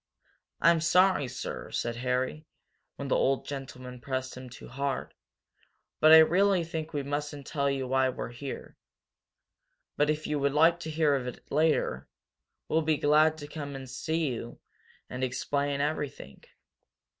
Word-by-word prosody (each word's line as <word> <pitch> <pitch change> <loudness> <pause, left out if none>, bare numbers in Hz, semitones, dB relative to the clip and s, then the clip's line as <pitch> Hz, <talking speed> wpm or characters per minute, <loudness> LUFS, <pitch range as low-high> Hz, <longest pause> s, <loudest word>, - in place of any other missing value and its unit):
"I'm 165 -1 +5
sorry, 180 -2 +4
sir," - - -6
said 120 0 -2
Harry, 130 +5 -2 0.5
when 140 - -6
the - - +2
old 135 0 +1
gentleman 130 -3 -7
pressed 130 0 -3
him 130 0 -9
too 125 - -11
hard. 140 +2 -3 0.9
"But 155 - +6
I 160 - +11
really 180 +3 +5
think 160 -1 -5
we 145 -3 -2
mustn't 145 0 -4
tell 140 -2 0
you 135 -2 -2
why 130 0 +2
we're 125 - -5
here. 130 +3 -8 1.2
But 145 0 +3
if 155 0 -1
you 150 -1 -1
would 140 0 +1
like 165 +3 +4
to 160 - -6
hear 155 -2 +2
of 130 -3 -1
it 125 - -9
later, 150 - +1 0.6
we'll 160 - +2
be 155 -1 +1
glad 155 +2 +4
to 145 -1 -8
come 145 -2 -6
to 135 -1 -7
see 155 +6 -2
you 120 -1 -6 0.5
and 130 +1 -5
explain 140 +2 -1
everything." 145 -2 -4
145 Hz, 155 wpm, -29 LUFS, 130-155 Hz, 1.2 s, I